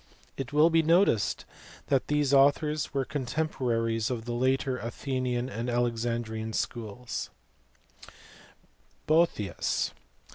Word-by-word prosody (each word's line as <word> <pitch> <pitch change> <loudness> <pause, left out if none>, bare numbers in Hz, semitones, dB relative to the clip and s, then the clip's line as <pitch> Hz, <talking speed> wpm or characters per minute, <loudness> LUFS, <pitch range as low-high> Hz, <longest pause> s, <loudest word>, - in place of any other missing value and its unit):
It 135 -1 -5
will 150 +3 +5
be 165 0 +5
noticed 165 - +2 0.4
that 135 -2 +2
these 150 -2 +1
authors 145 +2 +3
were 135 -2 -1
contemporaries 125 -5 -1
of 115 -3 -3
the 120 - -3
later 130 +1 +1
Athenian 125 +1 -2
and 120 0 -4
Alexandrian 115 -2 -1
schools 115 +2 -4
(see - - -23 1.0
above, 165 +2 +4
p. 105 - -3
115). 100 - -4
Boethius. - - -1
125 Hz, 120 wpm, -28 LUFS, 115-145 Hz, 1.0 s, will